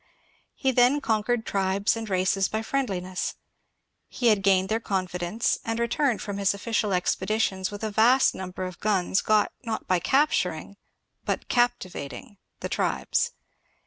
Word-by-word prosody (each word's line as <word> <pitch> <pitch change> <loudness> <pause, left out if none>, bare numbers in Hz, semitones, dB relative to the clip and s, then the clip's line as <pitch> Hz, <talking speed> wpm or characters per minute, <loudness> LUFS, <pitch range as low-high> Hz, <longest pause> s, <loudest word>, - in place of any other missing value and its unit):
He 265 - +1
then 250 +3 +4
conquered. 225 -2 0
tribes 195 +2 +1
and 225 -1 -5
races 190 +1 +1
by 220 +1 -3
friendliness; 190 -9 -2 0.7
he 240 -2 +1
had 210 -3 +3
gained 190 -1 +3
their 220 +2 0
confidence, 185 0 -1
and 225 0 -2
returned 235 +1 0
from 200 -1 -4
his 195 0 +2
ofiBcial 210 0 -1
expeditions 190 +1 0
with 205 +1 -8
a 215 - -2
vast 240 +5 +4
niunber 185 0 -5
of 185 - -10
guns 195 -2 +1
got 215 -1 +2
not 225 -2 -4
by 185 -1 +2
capturing 200 - +1 0.5
but - - -3
captivating 215 - -1 0.2
the - - -2
tribes. - - 0
205 Hz, 145 wpm, -26 LUFS, 190-230 Hz, 0.7 s, then